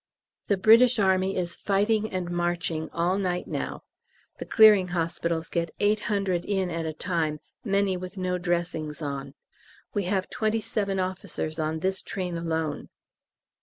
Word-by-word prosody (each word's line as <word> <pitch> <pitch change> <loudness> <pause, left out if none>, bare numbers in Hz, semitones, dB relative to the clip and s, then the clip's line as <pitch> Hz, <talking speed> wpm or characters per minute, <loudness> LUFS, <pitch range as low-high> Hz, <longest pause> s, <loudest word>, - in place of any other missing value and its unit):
The 200 - +2
British 230 +5 +6
Army 190 -1 +2
is 175 -2 -2
fighting 210 +2 +1
and 180 -2 -3
marching 175 -2 -1
all 180 +3 0
night 180 -2 -1
now. - - -4 0.6
The - - -5
Clearing 210 -4 +7
Hospitals 170 -1 -1
get 170 -1 -2
800 205 -4 +1
in 190 -3 -1
at 165 -1 -2
a 155 - -3
time, 160 -2 -1 0.2
many 200 -2 +1
with 185 +2 -8
no 180 -1 -1
dressings 170 -3 -2
on. 140 -1 -5 0.6
We 205 -3 0
have 190 0 0
twenty 220 0 0
seven 200 -3 -2
officers 185 -4 -3
on 155 0 -1
this 190 +1 0
train 180 -3 -4
alone. 160 -3 -2
180 Hz, 145 wpm, -27 LUFS, 165-200 Hz, 0.6 s, Clearing